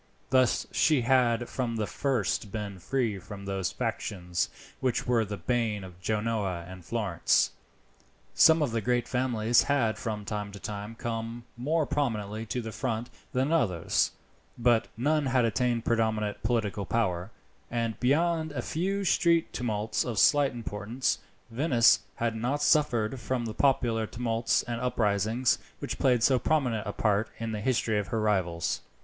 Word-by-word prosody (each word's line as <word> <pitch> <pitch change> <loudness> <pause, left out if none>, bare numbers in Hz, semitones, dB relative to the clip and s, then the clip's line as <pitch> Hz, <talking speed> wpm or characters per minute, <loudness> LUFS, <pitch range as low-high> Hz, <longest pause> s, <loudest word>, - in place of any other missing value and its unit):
Thus 130 -2 +3
she 155 -5 +3
had 120 -1 +2
from 120 -3 -2
the 110 -1 -1
first 115 -5 -1
been 100 -2 -5
free 110 +1 -1
from 100 +2 -9
those 95 -3 -2
factions 90 -3 -2 0.3
which 130 -2 0
were 120 -2 +2
the 105 -1 -5
bane 115 -5 -1
of 90 -1 -12
Genoa 105 -4 -1
and 90 -1 -10
Florence. 100 -4 +1 0.8
Some 160 -1 +6
of 135 - -1
the 115 0 -1
great 120 +2 0
families 120 -2 +2
had 130 -6 +1
from 105 -3 -4
time 105 -1 -4
to 100 - -8
time 105 +2 -6
come 115 +1 -4
more 150 +6 0
prominently 110 -7 -2
to 125 - -2
the 110 - -5
front 120 0 -3 0.2
than 130 +4 0
others, 95 - +2 0.5
but 120 -1 +3
none 145 +3 +1
had 125 -2 +3
attained 120 +1 0
predominant 110 -2 0
political 110 -4 -1
power, 95 -5 0 0.4
and 115 -2 -2
beyond 160 +4 +2
a 125 -4 -3
few 195 +5 -1
street 170 -3 +2
tumults 110 -3 -1
of 120 -4 -4
slight 145 +5 +5
importance, 120 +2 -2 0.3
Venice 120 -2 +4 0.2
had 115 -1 -1
not 130 +6 -1
suffered 130 -6 +2
from 125 -1 -2
the 110 - -4
popular 120 -5 +2
tumults 115 0 0
and 120 -1 -4
uprisings 115 0 +1 0.2
which - - -5
played 125 -4 +3
so 130 -1 +4
prominent 120 -7 0
a - - -1
part 105 +1 +1
in 115 -1 -4
the 105 -1 -3
history 115 -3 +1
of 100 - -3
her 110 +3 -1
rivals. 95 -6 0
115 Hz, 155 wpm, -28 LUFS, 105-125 Hz, 0.8 s, Some